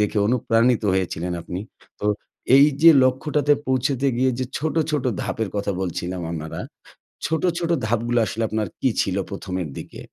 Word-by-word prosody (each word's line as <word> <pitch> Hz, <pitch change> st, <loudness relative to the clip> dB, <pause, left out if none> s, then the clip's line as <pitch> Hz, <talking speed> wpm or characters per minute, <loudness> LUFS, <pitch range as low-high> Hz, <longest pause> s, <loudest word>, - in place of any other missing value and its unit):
দেখে 105 Hz, +1 st, +1 dB
অনুপ্রাণিত 115 Hz, 0 st, +2 dB
হয়েছিলেন 90 Hz, -2 st, -2 dB
আপনি। 90 Hz, +2 st, -5 dB, 0.4 s
তো 105 Hz, -, -1 dB, 0.5 s
এই 140 Hz, -, +8 dB, 0.2 s
যে, 165 Hz, -, +10 dB
লক্ষ্যটাতে 145 Hz, +3 st, +2 dB
পৌঁছতে 130 Hz, +1 st, +1 dB
গিয়ে 130 Hz, +1 st, +3 dB
যে, 130 Hz, -, 0 dB
ছোট, 160 Hz, +1 st, -2 dB, 0.2 s
ছোট 150 Hz, -4 st, -1 dB, 0.2 s
ধাপের 110 Hz, -2 st, -2 dB
কথা 100 Hz, 0 st, -1 dB
বলছিলাম 90 Hz, 0 st, -3 dB
আমারা, 80 Hz, -1 st, -5 dB, 0.7 s
ছোট, 160 Hz, 0 st, 0 dB, 0.2 s
ছোট 170 Hz, -, -2 dB, 0.2 s
ধাপগুলো 120 Hz, +2 st, +1 dB
আসলে 115 Hz, +1 st, -3 dB
আপনার 110 Hz, -2 st, -1 dB
কি 130 Hz, -, +2 dB
ছিল 95 Hz, -, -1 dB, 0.2 s
১ম, 100 Hz, -1 st, -6 dB
এর 80 Hz, -, -6 dB
দিকে? -, -, -10 dB
115 Hz, 160 wpm, -23 LUFS, 95-130 Hz, 0.7 s, যে